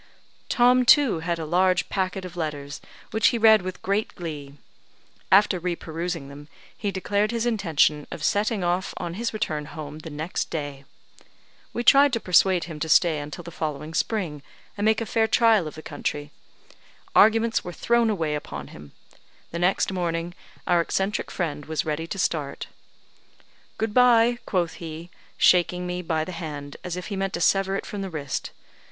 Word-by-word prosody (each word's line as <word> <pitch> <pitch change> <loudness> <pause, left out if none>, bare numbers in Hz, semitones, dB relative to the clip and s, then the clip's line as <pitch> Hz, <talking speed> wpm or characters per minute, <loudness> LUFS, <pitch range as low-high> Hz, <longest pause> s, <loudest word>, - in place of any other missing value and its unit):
Tom, 250 +1 +4
too, 255 - +5
had 170 +1 -2
a 160 - -4
large 180 +2 +2
packet 190 -1 -2
of 180 - -9
letters, 145 -4 -5 0.3
which 220 +1 +3
he 240 - +2
read 220 -2 +6
with 185 0 -7
great 200 +3 -1
glee. 150 -5 -7 0.8
After 195 -1 +5
re 175 0 -2
perusing 165 -2 -5
them, 145 +1 -11 0.3
he 205 - -3
declared 200 +2 0
his 235 0 -1
intention 165 -9 +1
of 155 - -7
setting 205 +1 +1
off 175 +2 -1
on 170 - -4
his 230 +5 -2
return 155 -9 -2
home 155 -1 -8
the 160 - -8
next 155 +4 -3
day. 145 -3 -5 0.9
We 240 - -3
tried 280 +1 +6
to 230 - +1
persuade 185 -2 +3
him 160 -3 -7
to 160 - -3
stay 160 -1 +4
until 145 +3 -7
the 170 - -9
following 155 -1 -4
spring, 165 -6 -1 0.3
and 205 - -2
make 220 +1 +3
a - - -2
fair 220 +1 +1
trial 220 -7 +4
of 155 - -8
the 155 - -10
country. 145 0 -4 0.8
Arguments 225 +1 +4
were 180 - -6
thrown 235 +5 +2
away 165 -8 -1
upon 75 - -6
him; 75 -1 -13 0.6
the 170 - -4
next 180 +2 +2
morning 170 -2 -2 0.3
our 175 -1 +3
eccentric 195 +4 -1
friend 150 -5 -4
was 160 0 -2
ready 155 +1 -2
to 195 - -5
start. 150 -6 -2 1.1
"Good 220 -1 -2
bye!" 240 -1 +5
quoth 175 -4 -1
he, 165 +2 -8 0.3
shaking 180 0 +3
me 180 0 -3
by 160 -2 -1
the 185 - -6
hand 150 -4 -6
as 180 -1 -4
if 180 - -6
he 200 - -3
meant 195 0 -2
to 170 - -3
sever 195 +2 +2
it - - -3
from 205 - -5
the 195 - -4
wrist. 150 -5 -4
175 Hz, 180 wpm, -25 LUFS, 155-205 Hz, 1.1 s, read